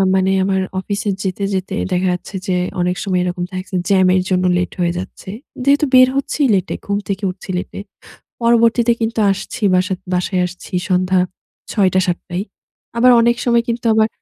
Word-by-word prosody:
মানে 190 0 +2
আমার 190 0 +1 0.2
অফিসে 200 +2 -3
যেতে, 190 +1 -3
যেতে 190 +1 -2 0.2
দেখা 180 +1 +1
যাচ্ছে 180 +2 -7
যে 185 - +1 0.3
অনেক 180 +1 0
সময় 185 -3 0
এরকম 175 0 -3
থাকছে 185 +1 -5
জ্যামের 185 -1 +4
জন্য 185 0 +1
লেট 180 0 -1
হয়ে 175 -1 +1
যাচ্ছে। 190 +1 -8 0.3
যেহেতু 285 +2 +3
বের 255 0 +8
হচ্ছিই 275 +1 0
লেটে, 190 -1 0
ঘুম 200 0 -1
থেকে 200 +1 -3
উঠছি 190 +1 -14
লেটে। 180 - -6 0.6
পরবর্তীতে 235 0 +3
কিন্তু 225 0 -1
আসছি 220 +5 -5
বাসা 185 +1 +1 0.2
বাসায় 180 +1 0
আসছি 180 +1 -12 0.2
সন্ধ্যা 185 0 +2 0.5
৬ 200 -4 +3
টা 185 - +4
৭ 175 -1 0
টায়। 180 +2 -3 0.5
আবার 250 +2 +6
অনেক 235 +1 +3
সময় 235 -1 +3
কিন্তু 235 0 -3
আবার 220 0 +3
190 Hz, 175 wpm, -18 LUFS, 185-230 Hz, 0.6 s, বের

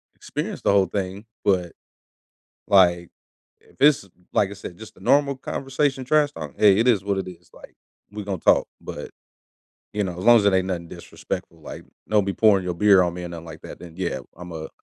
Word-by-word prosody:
experience - - -5
the - - +2
whole 100 -1 +4
thing, 95 +3 -4 0.2
but, 90 -4 +1 0.9
like, 85 -4 +4 0.5
if - - -25
it's, 145 -9 +4 0.3
like 100 - +2
I - - -7
said, 95 -3 -9
just 110 0 -12
a - - -16
normal 140 -1 +3
conversation 135 0 -2
trash 150 +1 +3
talk, 75 -3 -8
hey, 100 -2 +5
it 120 - +2
is 105 -6 +3
what 100 -1 -1
it 95 -1 -3
is, 90 -2 -12
like, - - -15 0.4
we're 105 0 -6
gonna 95 -2 -3
talk, - - +3
but, - - -8 0.8
you 105 -1 -1
know, 90 -2 -4
as 95 - -5
long 120 0 +8
as 105 - +3
it 100 - +4
ain't 95 0 +2
nothing 85 -2 -3
disrespectful, 80 -1 -7
like, - - -9 0.2
don't 105 -2 +3
be 100 - -1
pouring 100 -4 +3
your 90 -1 -2
beer 100 0 +5
on 85 -1 0
me 90 0 -6
or - - -5
nothing 85 -1 -8
like 80 - -10
that, - - -10
then 85 -2 -11
yeah, 85 -8 -2 0.2
Imma 80 -3 -7
95 Hz, 210 wpm, -23 LUFS, 90-105 Hz, 0.9 s, long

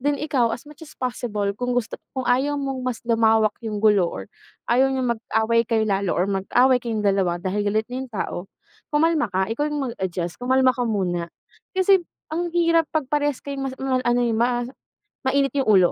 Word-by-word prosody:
Then 290 +2 +1
ikaw 275 -5 +1
as 240 - -17
much 300 +2 -15
as 315 -2 -12
possible 215 -5 -2
kung 245 +4 -2
gusto, 245 -2 -2 0.2
kung 260 - -1
ayaw 270 +4 +2
mong 270 -2 -3
mas 255 -2 -2
lumawak 225 -2 +3
yung 220 -2 -4
gulo 205 -5 +5
or - - -6 0.5
ayaw 260 +3 +4
niyang 260 -2 0
mag-away 225 0 0
kayo 225 -2 +2
lalo 200 -3 0
or 180 - +2
mag-away 240 +7 +2
kayong 225 -3 -3
dalawa 195 -3 +2
dahil 185 +4 -2
galit 215 +2 +1
na 255 - -3
yung 265 - -6
tao, 215 -5 -4 0.5
kumalma 305 -2 +2
ka, 190 +3 -1
ikaw 290 +6 -1
yung 285 -5 -2
mag - - -11
adjust 175 -1 -3
kumalma 260 +1 +3
ka 250 - -6
muna. 175 -5 -1 0.5
Kasi 380 0 +5 0.3
ang 345 +2 -1
hirap 335 -2 +3
pag 315 -2 -1
parehas 290 -2 0
kayong 275 -1 -3
mas 260 - -6
mal 265 -1 0
ano 240 0 +1
eh, 235 - +1
ma 240 +2 +1 0.6
mainit 275 +1 +1
yung 270 -5 +1
ulo. 185 -2 +5
245 Hz, 200 wpm, -23 LUFS, 210-270 Hz, 0.6 s, gulo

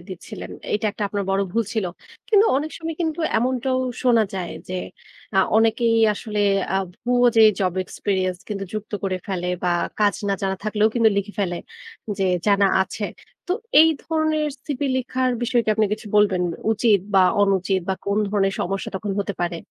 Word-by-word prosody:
দিচ্ছিলেন। 185 - -8 0.2
এইটা 210 +1 0
একটা 210 - -6
আপনার 200 0 -2
বড় 195 +1 +2
ভুল 230 0 +1
ছিল। 215 -4 0 0.4
কিন্তু 430 -1 +5
অনেক 305 +3 -2
সময় 325 0 -4
কিন্তু 320 0 -1 0.2
এমনটাও 255 +2 0 0.2
শোনা 240 -3 +4
যায় 180 -3 -4 0.2
যে 185 - -4 0.6
আ - - +5 0.2
অনেকেই 230 +1 +3 0.2
আসলে 210 -1 -4 0.3
আ - - +3 0.3
ভুয়া 245 0 +3
যে 225 - +8 0.2
জব 185 -2 +1
এক্সপেরিয়েন্স 185 -3 -2
কিন্তু 200 -2 -3
যুক্ত 215 0 -6
করে 190 -1 -1
ফেলে। 180 -2 -2
বা 180 - +1 0.3
কাজ 205 -1 +4
না 200 - +2
জানা 190 0 0
থাকলেও 215 0 +2
কিন্তু 230 -2 +5
লিখে 200 +1 -2
ফেলে 175 -3 -1 0.6
যে 195 - +1 0.2
জানা 200 -1 +4 0.2
আছে। 205 +2 -5 0.4
তো 360 - 0 0.3
এই 320 - +7
ধরনের 315 -1 0 0.2
সিভি 285 -2 -2
লিখার 255 0 0
বিষয় 240 0 +2
কি - - -6
আপনি 215 -1 +2
কিছু 215 +1 -4
বলবেন? 200 -3 +3 0.3
উচিত 215 -1 +3 0.2
বা 190 - +7 0.2
অনুচিত 190 -1 +1
বা 190 - +1
কোন 200 +1 +1
ধরনের 195 -1 +1
সমস্যা 195 +2 -2
তখন 205 +1 -4
হতে 200 -1 -3
পারে? 175 -1 -1
210 Hz, 175 wpm, -22 LUFS, 195-245 Hz, 0.6 s, যে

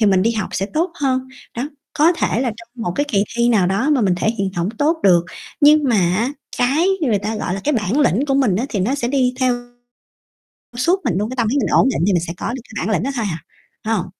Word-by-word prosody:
thì 215 - +4
mình 190 -2 +3
đi 230 - +2
học 215 -3 -3
sẽ 195 - -1
tốt 325 - -1
hơn. 260 -2 0 0.3
Đó, 240 - -1 0.3
có 320 +4 +4
thể 245 - -1
là 250 -3 0
trong 230 0 -13
một 175 - -2
cái 290 - +1
kỳ 205 -6 +2
thi 235 0 +3
nào 210 -6 +3
đó 210 +10 0
mà 290 -4 +3
mình 190 -5 +2
thể 215 +5 +1
hiện 195 -1 0
hổng 170 +1 0
tốt 315 +3 +2
được, 175 -3 +5 0.4
nhưng 300 0 +6
mà 240 -5 +2 0.2
á 235 +6 0 0.3
cái 280 +8 +2
người 240 -10 +1
ta 215 +3 -3
gọi 185 -3 -2
là 195 - -4
cái 300 - +1
bản 215 +2 0
lĩnh 275 -1 +2
của 275 - +1
mình 255 -9 +2
á 240 +6 -1
thì 205 - -2
nó 225 +9 0
sẽ 240 -4 -2
đi 255 -2 +1
theo 255 -1 +3 1.2
suốt 345 +10 +2
mình 240 - 0
luôn, 210 +3 -1
cái 255 - -5
tâm 235 -2 +1
lý 240 - 0
mình 280 - +1
ổn 265 - +4
định 245 - -1
thì 205 - +3
mình 175 - +2
sẽ 170 - -4
có 235 - -3
được 260 - -6
cái 220 -4 -5
bản 220 - 0
lĩnh 170 - -1
đó 270 - -1
thôi 230 -4 -1
à, 160 - -3 0.5
phải 225 - 0
hông? - - -2
235 Hz, 280 wpm, -19 LUFS, 200-270 Hz, 1.2 s, nhưng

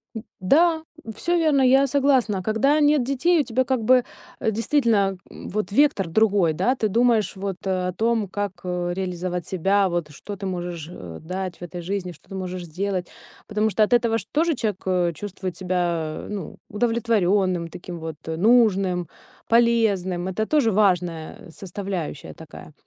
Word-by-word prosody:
М, 225 - -5 0.2
да, 320 - +3 0.3
всё 345 +10 0
верно, 305 -5 +3
я 265 +2 +5
согласна. 260 -8 +2
Когда 270 +9 +2
нет 295 -1 +4
детей, 275 +7 +2
у 295 - +3
тебя 255 +1 0
как 255 -3 -1
бы, 255 +2 +5 0.4
э, 220 - 0
действительно, 220 -4 +1
м - - -10
вот 205 -1 -3
вектор 250 -7 +3
другой, 200 -4 +3
да. 245 +12 +1
Ты 220 -4 0
думаешь 230 -1 +2
вот 195 -1 -4
о 185 -1 -1
том, 225 +1 0
как, 205 +1 -3
э, 180 -1 -2
реализовать 180 -2 -3
себя, 195 +2 +2
вот 170 -3 -2
что 200 +8 -8
ты 195 - -7
можешь, 175 -3 -4
э, 85 - -9
дать 185 +1 -5
в - - -6
этой 175 0 -6
жизни, 185 0 -3
что 160 - -19
ты 195 - -7
можешь 185 -1 -5
сделать. 180 +2 -3 0.4
Потому 215 +1 +1
что 215 +1 +2
от 230 - +1
этого 230 -2 +3
ж 200 - -6
тоже 325 +2 +2
человек, 210 -5 -2
э, 180 -2 +1
чувствует 185 0 -6
себя, 175 -4 -2
ну, 200 -5 -6
удовлетворённым, 205 -6 +1
таким 175 0 -8
вот, 160 -1 -6
э, 160 - -2
нужным, 195 -5 +3 0.4
полезным. 215 -7 +2
Это 215 +4 -1
тоже 275 -6 +2
важная 180 -6 0
составляющая 185 -4 -5
такая. 160 -1 -12
195 Hz, 170 wpm, -23 LUFS, 180-230 Hz, 0.4 s, я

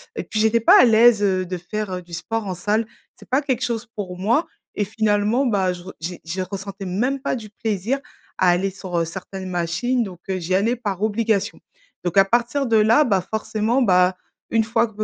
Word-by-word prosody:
et - - -3
puis 215 - -3
j'étais 220 +1 +3
pas 230 - +7
à - - +7
l'aise, 225 -1 +5
heu, 185 -2 +1
de 180 0 -4
faire, 195 +2 -4
heu, 180 - -4
du 175 -1 -16
sport 220 +5 -3
en 185 - -3
salle. 215 +5 0 0.3
C'est - - -18
pas 265 +3 +2
quelque 255 -4 -1
chose 235 -1 -2
pour 185 -4 -5
moi 235 - +1 0.3
et 205 - 0
finalement, 215 +4 +1
bah, 195 -6 +1
je 175 0 -10
re 190 - -9
j'ai 175 +2 -5
j'y 175 +3 -4
ressentais 195 +1 -6
même 250 +9 -1
pas 275 - -1
du 215 -3 -8
plaisir 220 +5 -2 0.4
à 185 - +4
aller 190 +2 +1
sur, 185 -2 -5
heu, 165 - +1
certaines 185 +2 -7
machines 175 +9 0
donc 185 -4 -8
heu, 185 -1 -1
j'y 180 +2 -1
allais 225 +6 +2
par 205 -5 -4
obligation. 220 -1 0 0.4
Donc 175 +2 -2
à 195 - +7
partir 240 +6 +1
de 225 -1 +3
là, 220 +7 +5
bah, 195 -5 +2
forcément, 220 +3 0
bah, 180 -2 +3 0.3
une 225 -1 +2
fois 230 +1 +1
gu 220 - -18
205 Hz, 220 wpm, -22 LUFS, 185-230 Hz, 0.4 s, pas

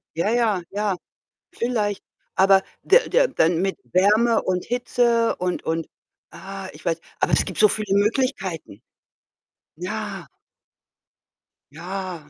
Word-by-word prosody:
Ja, 170 +5 0
ja, 225 -5 +2
ja, 205 -1 -1 0.6
vielleicht. 215 -4 -1 0.3
Aber 195 0 +5 0.2
der 470 +5 +4
der - - +3
dann 165 - +2
mit 195 0 -1 0.2
Wärme 215 +5 +4
und 180 -1 -1
Hitze 240 -1 +1
und 180 0 -2
und 165 0 -2 0.4
ah, 195 0 -8
ich - - -15
weiß 165 -1 0 0.2
aber - - +1
es - - +4
gibt 185 - -7
so 215 - +7
viele 210 -1 -1
Möglichkeiten. 200 - -1 1.0
Ja. 195 0 -5 1.5
Ja. 175 -1 -6
195 Hz, 120 wpm, -23 LUFS, 180-230 Hz, 1.5 s, so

